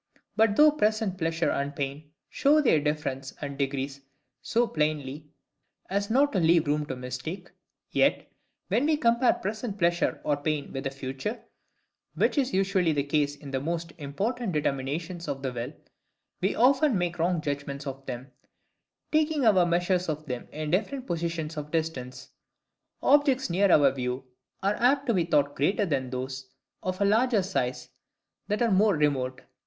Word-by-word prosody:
But, 220 -1 +3
though 300 +3 +7
present 215 -8 0
pleasure 165 0 0
and 140 +1 -2
pain 140 +2 -4 0.2
show 295 +2 +3
their 240 - +4
difference 145 -3 -3
and 140 -1 -5
degrees 140 0 -2 0.4
so 235 +2 +1
plainly 150 - -2 0.6
as 200 +1 0
not 280 +5 +3
to 195 - +2
leave 165 -1 +4
room 150 0 0
to 130 - -4
mistake; 125 +9 -6 0.4
yet, - - +2 0.4
WHEN 260 +6 +2
WE 310 -1 +3
COMPARE 235 -3 +3
PRESENT 210 +1 -4
PLEASURE 175 -2 +1
OR 145 -1 +1
PAIN 145 0 -2
WITH 135 0 -3
FUTURE, 135 - -5 0.7
(which - - +2
is 265 -1 0
usually 190 -3 +2
the 145 -1 0
case 145 0 0
in 145 -1 -10
most 165 0 -3
important 200 - -2
determinations 155 +4 -2
of 135 0 -4
the 130 -2 -2
will,) 120 +2 -4 0.7
we 190 - +1
often 265 0 +4
make 175 -1 -2
wrong 175 +1 +1
judgments 140 -1 -4
of 135 0 -6
them; 130 +1 -6 0.8
taking 305 -3 +2
our 190 -5 +5
measures 175 +1 +1
of 155 0 -3
them 125 -4 -5
in 155 0 -4
different 235 +8 -1
positions 165 -5 -3
of 150 0 -5
distance. 155 -6 -3 0.7
Objects 275 - +3
near 195 +3 +3
our 140 -4 +6
view 125 0 -3 0.4
are 200 +1 +2
apt 275 +3 +3
to 235 - +2
be 180 -4 +2
thought 145 -3 +2
greater 195 +9 +1
than 135 -7 -1
those 130 +1 -5 0.3
of 185 0 -3
a - - +4
larger 220 0 +3
size 130 -10 -2 0.6
that 210 +4 0
are 230 - +2
more 200 +1 +4
remote. 135 -4 0
165 Hz, 160 wpm, -27 LUFS, 140-210 Hz, 0.8 s, though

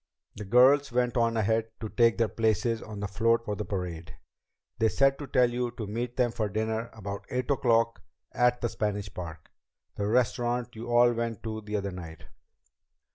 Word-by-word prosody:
The 105 - -7
girls 130 +6 +5
went 125 +1 +1
on 115 -1 +2
ahead 110 +1 +1
to 110 - -4
take 115 +1 +3
their 115 - +2
places 110 +1 0
on 105 -2 -8
the 100 - -2
float 115 +3 +1
for 105 - -2
the 105 - -3
parade. 85 -4 -5 0.6
They 110 - +4
said 135 +3 +2
to 145 - -6
tell 125 -1 +3
you 120 0 -1
to 110 - -3
meet 120 +4 -4
them 125 -2 +2
for 110 -2 -2
dinner 110 +2 -2
about 100 -2 -7
eight 125 +2 -2
o'clock 115 -4 +2 0.3
at 125 0 +2
the 120 - 0
Spanish 105 -3 -3
Park, 80 -3 -8 0.5
the 100 - -1
restaurant 120 +1 0
you 115 +2 -7
all 120 0 +5
went 115 -2 -3
to 110 -1 -4
the 105 0 -5
other 100 -1 -3
night." 85 -3 -9
115 Hz, 185 wpm, -28 LUFS, 105-120 Hz, 0.6 s, girls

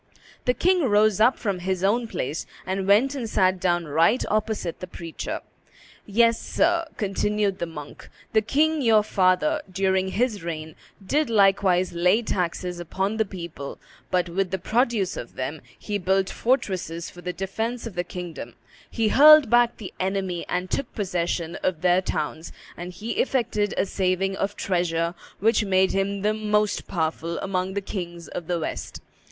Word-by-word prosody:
The 250 - +2
king 365 0 +3
rose 215 -2 +3
up 245 +4 +5
from 200 -5 -2
his 185 0 -2
own 230 +4 +2
place, 150 -6 -4 0.2
and 190 0 -2
went 225 +8 +4
and 245 -5 -4
sat 185 -2 +2
down 175 -2 +1
right 165 - +3
opposite 215 -5 -1
the 185 - -6
preacher. 170 -2 -6 0.7
"Yes, 230 +2 +3
sir," 335 0 +1
continued 205 -1 0
the 170 - -2
monk, 150 -3 -10 0.2
"the 220 - +5
king 300 +7 +1
your 220 -4 +5
father, 205 +11 +2
during 190 0 +1
his 215 +1 0
reign, 160 -2 -5 0.3
did 295 +5 +1
likewise 195 -4 +3
lay 180 +7 +3
taxes 180 -2 -2
upon 190 +5 -2
the 220 - +2
people, 170 -7 -7 0.3
but 180 -1 +1
with 185 +2 -1
the 190 - -1
produce 220 0 0
of - - -8
them - - -4 0.2
he 205 -1 -3
built 190 +1 +1
fortresses 185 - -1
for 175 - -12
the 180 +1 -3
defence 220 +7 -3
of 230 - -6
the 175 0 -1
kingdom, 170 -9 -7 0.3
he 225 -2 0
hurled 300 -2 +8
back 240 0 +4
the 205 - -8
enemy 190 -2 -2
and 180 +1 -2
took 275 -3 -2
possession 175 -4 -2
of 175 -4 -1
their 180 0 +4
towns, 160 -2 -3 0.2
and 180 +1 -7
he 215 +7 -5
effected 225 -6 0
a - - +2
saving 190 0 0
of 200 +1 -2
treasure 170 -3 0 0.3
which 225 +2 +3
made 190 -1 +3
him 195 0 -1
the 210 +1 +2
most 210 -1 0
powerful 165 0 -2
amongst 190 0 -2
the 200 - 0
kings 175 -4 -6
of 165 - -6
the 175 -1 0
West. 155 - -5
190 Hz, 165 wpm, -24 LUFS, 175-220 Hz, 0.7 s, hurled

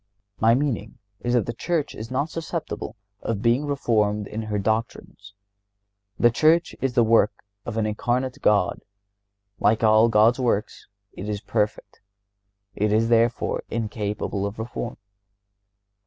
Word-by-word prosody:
My 115 +1 +5
meaning 125 -6 -2 0.2
is 120 0 0
that 120 - +2
the 120 - -3
Church 160 +4 -2
is 110 +2 -7
not 140 +5 -1
susceptible 160 -10 -5 0.3
of 110 -2 -3
being 120 +5 +2
reformed 105 -7 +1
in 110 +2 -5
her 110 -1 -3
doctrines. 100 -1 -3 0.8
The 120 - +5
Church 160 +7 +3
is 135 -2 0
the 120 - +5
work 110 -2 +3 0.2
of 115 -2 -4
an 110 - +1
Incarnate 125 +4 -1
God. 100 -2 +2 0.8
Like 110 +2 +2
all 110 +1 +5
God's 110 +3 +4
works, 115 -5 -1 0.3
it 100 +3 -6
is 105 -1 -2
perfect. 105 0 -2 0.7
It 105 +1 +1
is, 110 +2 +2
therefore, 115 0 +2
incapable 105 -3 -3
of 100 - -7
reform. 115 +1 -5
115 Hz, 140 wpm, -24 LUFS, 105-120 Hz, 0.8 s, My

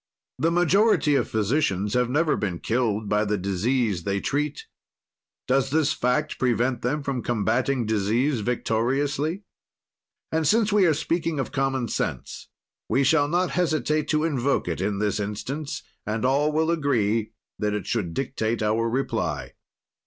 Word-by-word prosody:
"The 160 +5 +2
majority 175 -1 +3
of 135 -4 +1
physicians 105 -3 0
have 125 -1 +2
never 150 +4 +2
been 95 -5 -2
killed 110 0 -1
by 105 +1 +2
the 105 0 0
disease 100 +2 0
they 100 +2 -1
treat. 145 +6 -2 0.8
"Does 135 +1 +2
this 155 +1 +2
fact 150 +4 -1
prevent 120 0 +1
them 140 +4 -1
from 135 -3 -2
combatting 120 +3 0
disease 110 +6 +1
victoriously? 135 - -1 0.9
"And 160 -1 +1
since 215 +4 +3
we 200 -3 +5
are 160 - +3
speaking 165 0 -1
of 135 - -3
common 135 -3 0
sense - - -4 0.4
we 135 - +3
shall 145 +1 +3
not 175 +3 +1
hesitate 155 -3 0
to 155 +1 +1
invoke 140 - 0
it 85 - -2
in 100 +1 -1
this 105 +1 0
instance, 130 +9 -4 0.2
and 110 +3 -2
all 140 +4 +2
will 160 +2 +1
agree 115 -9 0 0.3
that 105 -1 0
it 105 -4 -4
should 100 -6 -2
dictate 115 -4 -1
our 110 +2 +1
reply. 130 +4 -2
130 Hz, 150 wpm, -25 LUFS, 110-150 Hz, 0.9 s, we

